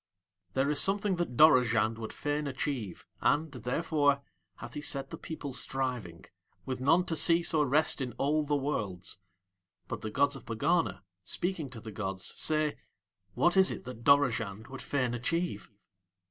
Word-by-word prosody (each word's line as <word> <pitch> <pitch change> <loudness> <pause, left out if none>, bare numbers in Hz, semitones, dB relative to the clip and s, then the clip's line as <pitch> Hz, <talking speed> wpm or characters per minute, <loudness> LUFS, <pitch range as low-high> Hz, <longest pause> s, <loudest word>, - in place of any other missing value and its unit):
There 135 +2 +1
is 150 - +5
something 200 -1 +2
that 170 -9 -3
Dorozhand 115 -7 +5
would 110 - -5
fain 145 0 -2
achieve, 130 - -4 0.2
and, 155 +1 +2
therefore, 140 +3 +1 0.3
hath 120 +4 -9
he 150 - -5
set 135 -2 -2
the - - -5
people 145 -4 -6
striving, 125 -11 -3 0.4
with 130 -1 -4
none 165 +7 +4
to 165 - -2
cease 165 +2 +3
or 150 -2 +3
rest 150 +1 +3
in 125 -3 -3
all 150 +5 +1
the 145 0 0
worlds. 105 -11 -3 0.7
But - - -5
the 110 - -4
gods 140 +6 +2
of 135 - -11
Pegana, 115 - 0 0.2
speaking 170 - -2
to 120 -2 -9
the 110 0 -8
gods, 95 -2 -4
say: 155 -1 0 0.6
"What 175 +1 +3
is 190 0 +6
it - - -5
that 125 -2 -9
Dorozhand 115 -6 +2
would 135 0 -8
fain 125 -4 -1
achieve?" 130 - -2
140 Hz, 160 wpm, -30 LUFS, 115-155 Hz, 0.7 s, is